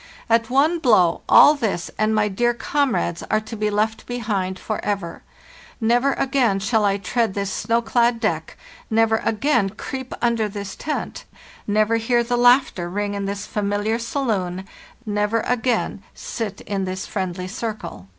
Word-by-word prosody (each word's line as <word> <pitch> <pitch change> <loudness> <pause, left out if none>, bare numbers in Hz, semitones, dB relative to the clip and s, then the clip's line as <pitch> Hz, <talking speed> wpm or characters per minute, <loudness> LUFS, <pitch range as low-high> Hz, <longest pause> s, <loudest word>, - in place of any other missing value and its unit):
At 230 0 +3
one 295 +7 +3
blow 200 - +3
all 295 - +8
this 220 - -2
and 215 0 +1
my 210 -1 +2
dear 240 +4 +1
comrades 240 - 0
are 215 - +3
to 220 +1 -8
be 210 0 0
left 215 +2 -1
behind 205 -6 -2
forever; 200 -4 -3 0.6
never 245 +4 +2
again 255 -7 +1
shall 215 +2 +1
I 200 0 +2
tread 210 +1 -1
this 200 -1 -2
snow 230 +1 0
clad 235 +1 +2
deck, 220 - -2 0.3
never 225 0 +3
again 225 -1 +1
creep 260 +5 -6
under 230 -3 +1
this 200 -1 -6
tent, 305 - -4 0.4
never 215 +2 +2
hear 235 +1 +1
the 245 +1 -1
laugh 245 +2 +5
ter 175 -1 -5
ring 205 +2 -2
in 200 -1 -3
this 200 +1 -4
familiar 205 +2 -1
saloon, 200 -8 -2 0.4
never 210 +1 0
again 245 -4 -1
sit 215 -4 -5
in 195 -2 -3
this 185 0 -4
friendly 185 -2 -4
circle. 205 - -6
220 Hz, 155 wpm, -22 LUFS, 200-240 Hz, 0.6 s, all